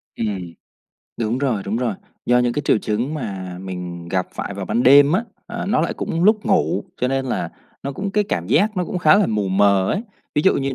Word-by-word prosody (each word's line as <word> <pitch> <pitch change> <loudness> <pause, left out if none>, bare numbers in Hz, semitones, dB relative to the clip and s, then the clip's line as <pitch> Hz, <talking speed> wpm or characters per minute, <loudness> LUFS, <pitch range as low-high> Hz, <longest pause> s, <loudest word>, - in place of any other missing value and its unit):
Ừm. 95 -6 -3 0.7
Đúng 115 +2 0
rồi, 125 -8 0
đúng 105 +3 -2
rồi, 120 -3 -1 0.3
do 125 +1 +4
những 125 -1 +2
cái 145 - -2
triệu 115 - +3
chứng 115 +8 -2
mà 95 -10 -5
mình 90 -2 -6
gặp 90 0 0
phải 100 - -4
vào 100 0 -4
ban 120 - +1
đêm 140 +3 +7
á, 210 +6 +1 0.2
à, 235 0 -5
nó 245 +5 +2
lại - - -1
cũng 165 +2 -2
lúc 215 0 +3
ngủ, 195 -2 +1 0.2
cho 125 - +2
nên 135 0 -1
là 125 - -2 0.3
nó 140 - -3
cũng 195 +8 -4
cái 210 +1 +1
cảm 85 - -2
giác 200 - +2
nó 180 - +1
cũng 180 - -3
khá 160 +3 +6
là 210 - +3
mù 105 -3 -1
mờ 100 0 +3
ấy. 200 - -1 0.3
Ví 150 - +2
dụ 190 - +4
như 135 -1 -1
125 Hz, 235 wpm, -21 LUFS, 100-165 Hz, 0.7 s, đêm